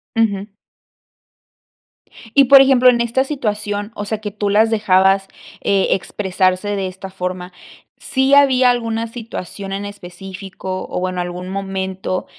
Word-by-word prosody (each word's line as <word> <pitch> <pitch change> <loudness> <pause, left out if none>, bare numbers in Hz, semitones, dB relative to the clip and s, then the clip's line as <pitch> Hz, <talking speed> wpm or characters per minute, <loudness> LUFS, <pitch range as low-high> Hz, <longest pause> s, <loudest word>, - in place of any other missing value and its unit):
Ujú. 210 -2 0 1.8
Y, 275 -1 +6
por 275 +1 +8
ejemplo, 260 -2 +5
en 240 -1 +2
esta 235 +3 +1
situación, 210 -6 -3
o 205 - -5
sea, 215 +1 -3
que 210 -1 -5
tú 205 0 -2
las 215 +2 +4
dejabas, 195 -2 +3 0.3
eh, 195 -1 +2
expresarse 190 +1 0
de 195 -1 -2
esta 190 +1 -8
forma, 180 -1 -5 0.4
¿sí 265 +1 0
había 265 -3 +5
alguna 230 -1 -2
situación 215 -4 -7
en 200 +1 -4
específico 190 -1 -7
o, - - -3
bueno, 185 0 -2
algún 180 +1 -6
momento 190 -1 -3
200 Hz, 135 wpm, -18 LUFS, 190-230 Hz, 1.8 s, por